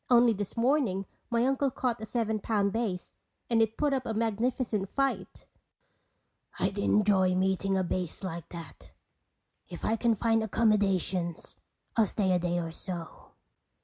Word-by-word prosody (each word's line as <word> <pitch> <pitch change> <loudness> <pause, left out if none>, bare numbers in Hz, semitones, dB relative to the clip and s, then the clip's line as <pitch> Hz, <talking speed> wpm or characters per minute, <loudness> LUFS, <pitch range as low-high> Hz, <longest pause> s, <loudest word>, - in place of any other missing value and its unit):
"Only 240 -1 +6
this 205 +2 -5
morning 230 -6 +2 0.2
my 235 0 +2
uncle 270 +1 +2
caught 245 -3 -2
a 220 - -5
seven 220 -2 -1
pound 200 -2 0
bass. 215 -6 -2 0.4
And 225 -1 +4
it 225 0 +1
put 295 -2 +2
up 260 -2 -1
a 225 - -2
magnificent 225 -2 0
fight." 275 -1 -2 1.1
"I'd 200 - -1
enjoy 195 -3 +3
meeting 190 +1 +1
a 190 - +1
bass 180 0 -3
like 170 -3 -5
that. 165 -4 -10 0.8
If 175 - -6
I 220 - +2
can 230 0 +2
find 225 +1 +2
accommodations 195 -6 +1 0.4
I'll 225 -3 +4
stay 190 -2 0
a 180 - +3
day 175 0 0
or 165 -1 -2
so." 170 -1 -7
210 Hz, 150 wpm, -29 LUFS, 185-230 Hz, 1.1 s, Only